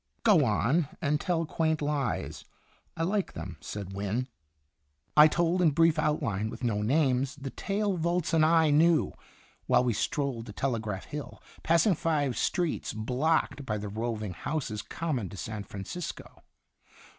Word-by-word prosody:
"Go 200 -9 +6
on, 130 +8 +2
'and 150 -2 0
tell 170 -3 0
quaint 160 0 0
lies' 145 -3 -2 0.5
I 165 - 0
like 195 +3 0
them," 85 +1 -7
said 100 -2 -6
Wynne. 105 +6 -2 0.9
I 150 0 +9
told 170 +3 +1
in 170 - +5
brief 165 +1 +3
outline, 125 -10 0
with 125 - -8
no 110 -4 0
names, 135 +2 +1
the 135 -2 -7
tale 200 -1 -1
Volz 170 0 0
and 160 -1 +5
I 160 -1 +4
knew, 155 - +4 0.5
while 125 - +4
we 120 -2 +1
strolled 125 +1 -2
to 105 - -8
Telegraph 110 -6 -2
Hill, 150 -1 -7 0.2
passing 170 +5 +4
five 145 -6 0
streets 175 - -1
blocked 130 +7 0
by 105 -5 -2
the 105 0 -5
roving 110 -2 -3
houses 115 - -3
common 130 - -3
to 100 - -10
San 105 0 -5
Francisco. 105 - -7
145 Hz, 150 wpm, -29 LUFS, 110-165 Hz, 0.9 s, I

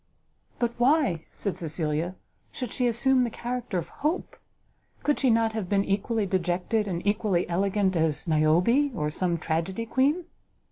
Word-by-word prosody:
"But 240 -1 0
why," 245 - +3
said 200 - -3
Cecilia, 160 +1 -2 0.4
"should 250 -4 -5
she 250 - 0
assume 255 +3 +3
the 245 - +1
character 240 -3 -4
of 170 -1 -4
Hope? 315 +5 -1 0.7
Could 295 - +1
she 265 - +3
not 225 -1 +3
have 215 -5 -3
been 200 -1 +2
equally 210 +2 0
dejected 185 +3 0
and 175 -1 -3
equally 205 -3 +1
elegant 190 +2 +1
as 160 0 0
Niobe, 175 - +3
or 150 -3 -1
some 175 +1 0
tragedy 170 +7 -2
queen?" 285 +9 +1
200 Hz, 150 wpm, -27 LUFS, 175-240 Hz, 0.7 s, why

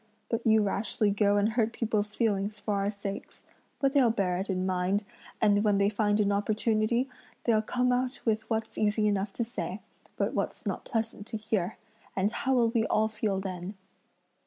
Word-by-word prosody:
But 230 0 -1
you 220 -1 +5
rashly 205 +1 +1
go 205 0 +3
and 205 +1 +3
hurt 225 0 +1
people's 215 -2 -1
feelings 210 -2 0
for 210 - -2
our 200 0 +1
sakes; 200 -1 -6 0.4
but 275 -1 +2
they'll 270 -5 +5
bear 195 -5 0
it 195 - -4
in 185 -1 0
mind, 185 +2 +1 0.4
and 205 -1 +4
when 205 -2 +3
they 200 0 +3
find 210 0 +1
an 205 -1 +3
opportunity, 215 +4 +1 0.4
they'll 220 -3 +3
come 250 +3 +1
out 250 +1 0
with 220 -1 0
what's 225 0 -2
easy 210 0 +2
enough 200 -1 0
to 235 - -1
say, 200 -5 -4 0.4
but - - 0
what's - - -3
not - - -3
pleasant 225 -2 -3
to 225 - -4
hear, 215 -3 -1 0.4
and 195 +2 +1
how 265 +1 0
will 235 -2 +4
we 225 -1 +1
all 220 0 +2
feel 210 -3 -1
then?" 190 0 -5
215 Hz, 185 wpm, -29 LUFS, 200-225 Hz, 0.4 s, you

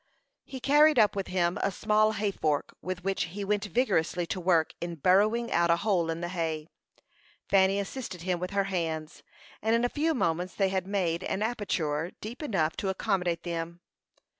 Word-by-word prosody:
He 265 - -7
carried 295 +4 +5
up 210 -1 +4
with 195 -1 -2
him 175 -1 0
a - - +2
small 215 +2 +2
hay 210 -1 -1
fork, 150 -6 -1
with 185 -1 -5
which 195 0 0
he 195 +4 -6
went 205 +1 0
vigorously 190 -7 +1
to 185 - -3
work 170 -3 +2
in 170 0 -4
burrowing 210 - +3
out 170 0 +2
a 170 - +6
hole 180 -3 0
in 165 +1 -3
the 175 - -3
hay. 165 -3 -3 0.8
Fanny 195 0 +4
assisted 200 -3 -5
him 180 -1 -1
with 180 +1 -3
her 200 0 +1
hands, 165 -4 -3 0.4
and 220 +2 +2
in 235 +1 +2
a - - +1
few 315 +3 0
moments 180 -4 -1
they 195 -2 +2
had 190 -1 -2
made 185 -3 -1
an 200 - -1
aperture 175 -8 -1
deep 230 +7 -7
enough 180 - 0
to 195 - -2
accommodate 180 -3 -1
them. 170 0 -4
190 Hz, 190 wpm, -28 LUFS, 170-210 Hz, 0.8 s, a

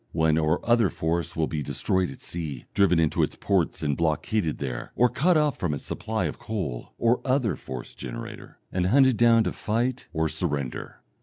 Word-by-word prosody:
One 80 -1 +3
or 80 0 0
other 120 -4 +4
force 85 +1 -2
will 80 - +1
be 75 -1 -3
destroyed 95 +5 0
at 65 - -10
sea, 80 -7 -4
driven 95 -4 +4
into 80 -2 +2
its - - 0
ports 95 -5 0
and 70 -2 +1
blockaded 80 +3 0
there, 65 -4 -5
or 125 0 +4
cut 170 +7 +3
off 150 -2 +1
from 80 -5 0
its 70 - -7
supply - - -2
of - - -4
coal 90 - -4
(or 115 +1 +2
other 130 - +1
force 65 -2 -7
generator), 60 - -8
and 90 -1 0
hunted 130 +3 +5
down 115 0 +5
to - - -1
fight 120 +4 -1
or 80 -1 0
surrender. 75 -5 -3
85 Hz, 185 wpm, -26 LUFS, 75-115 Hz, -, hunted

